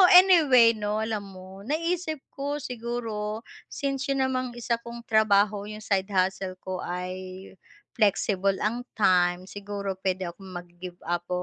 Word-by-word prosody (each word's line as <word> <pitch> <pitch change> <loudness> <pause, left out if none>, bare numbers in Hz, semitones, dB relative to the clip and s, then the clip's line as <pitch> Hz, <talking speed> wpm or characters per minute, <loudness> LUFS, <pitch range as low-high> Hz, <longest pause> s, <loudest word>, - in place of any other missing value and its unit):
anyway 310 -11 +8
'no 210 -1 -2
alam 215 -3 -3
mo 185 +1 -11
naisip 315 - -2
ko 285 +1 -2
siguro 230 -3 -4 0.3
since 275 -1 -2
yun 270 -1 +2
namang 255 -1 -1
isa 235 0 -1
kong 235 0 -8
trabaho 210 -2 +3
yung 215 0 -8
side 195 -2 +1
hustle 190 -1 0
ko 185 -1 -4
ay 185 +1 -6 0.5
flexible 200 -2 +2
ang 240 +4 -1
time. 180 -3 +3
Siguro 200 0 -5
pwede 185 -2 -1
akong 190 +3 -14
mag-give 175 0 -8
up 175 +1 -2
205 Hz, 135 wpm, -27 LUFS, 185-240 Hz, 0.5 s, anyway